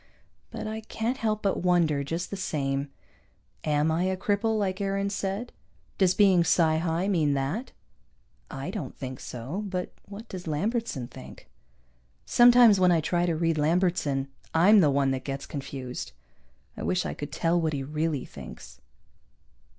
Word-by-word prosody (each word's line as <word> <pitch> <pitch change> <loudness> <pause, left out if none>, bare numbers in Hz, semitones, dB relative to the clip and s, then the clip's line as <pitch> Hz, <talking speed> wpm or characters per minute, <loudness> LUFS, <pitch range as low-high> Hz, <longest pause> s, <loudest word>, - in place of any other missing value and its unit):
But - - -6
I 220 +1 -4
can't 225 +3 -3
help 215 -3 -1
but 195 - 0
wonder, 170 -5 +2
just 165 +5 -4
the - - -2
same. 140 -6 -2 0.7
Am 150 +1 +1
I 170 +3 +1
a 190 0 0
cripple 210 +3 0
like 195 -1 -1
Aarons 195 0 -1
said? 200 +5 -3 0.5
Does 185 -2 +4
being 190 -4 +5
psi 160 -1 +3
high 165 +3 0
mean 155 -8 +2
that? 145 - -2 0.8
I 135 +6 -5
don't 175 - -6
think 130 -1 -6
so, 130 - -5
but 180 -2 -4
what 210 +3 -9
does 180 -4 -8
Lambertson 170 - -2
think? - - -12 0.7
Sometimes 240 -4 +7
when 180 -1 +5
I 170 - +4
try 175 +3 0
to 170 - +1
read 165 -1 0
Lambertson 155 -4 +1 0.3
I'm 200 +6 +7
the 155 -6 +5
one 140 -1 +2
that 130 -1 -2
gets 135 0 -4
confused. 135 - -6 0.6
I - - -8
wish 180 0 0
I - - -3
could 145 - -7
tell 170 +1 +1
what 160 -1 0
he 140 -2 -2
really 150 0 -2
thinks. - - -11
175 Hz, 160 wpm, -27 LUFS, 145-200 Hz, 0.8 s, Sometimes